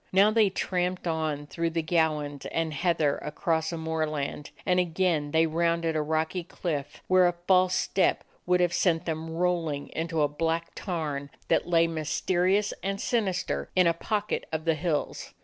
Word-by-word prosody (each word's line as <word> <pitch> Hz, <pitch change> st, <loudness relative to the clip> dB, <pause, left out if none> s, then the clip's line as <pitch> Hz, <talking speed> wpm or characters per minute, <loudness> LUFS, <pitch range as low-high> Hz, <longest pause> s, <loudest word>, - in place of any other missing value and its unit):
Now 200 Hz, +3 st, +5 dB
they 215 Hz, -2 st, +4 dB
tramped 180 Hz, -1 st, -2 dB
on 155 Hz, -3 st, -1 dB
through 165 Hz, +3 st, -2 dB
the 165 Hz, 0 st, -2 dB
gowans 155 Hz, -4 st, 0 dB
and 165 Hz, -1 st, -1 dB
heather 155 Hz, -2 st, +1 dB
across 160 Hz, +1 st, -1 dB
a 170 Hz, -, -3 dB
moorland, 155 Hz, -3 st, -2 dB, 0.2 s
and 180 Hz, -1 st, +3 dB
again 170 Hz, -3 st, +1 dB
they 160 Hz, +2 st, +3 dB
rounded 165 Hz, 0 st, 0 dB
a 155 Hz, -, +2 dB
rocky 160 Hz, +3 st, -1 dB
cliff, 155 Hz, -4 st, -4 dB
where 185 Hz, -1 st, +5 dB
a 175 Hz, -, 0 dB
false 185 Hz, -1 st, +4 dB
step 190 Hz, -, +1 dB, 0.2 s
would 180 Hz, 0 st, +3 dB
have 175 Hz, -1 st, +2 dB
sent 175 Hz, -1 st, +2 dB
them 160 Hz, 0 st, -3 dB
rolling 165 Hz, -4 st, -1 dB
into 165 Hz, -1 st, -1 dB
a -, -, +4 dB
black 165 Hz, +3 st, -2 dB
tarn 150 Hz, -7 st, -3 dB, 0.2 s
that -, -, +2 dB
lay, 165 Hz, -1 st, +4 dB
mysterious 180 Hz, +5 st, +1 dB
and 195 Hz, +1 st, -2 dB
sinister, 180 Hz, -, -1 dB
in 185 Hz, -, +5 dB
a 170 Hz, -, +4 dB
pocket 210 Hz, +5 st, -2 dB
of 160 Hz, 0 st, -3 dB
the 165 Hz, -, +3 dB
hills. 155 Hz, -1 st, -2 dB
165 Hz, 165 wpm, -27 LUFS, 155-180 Hz, 0.2 s, Now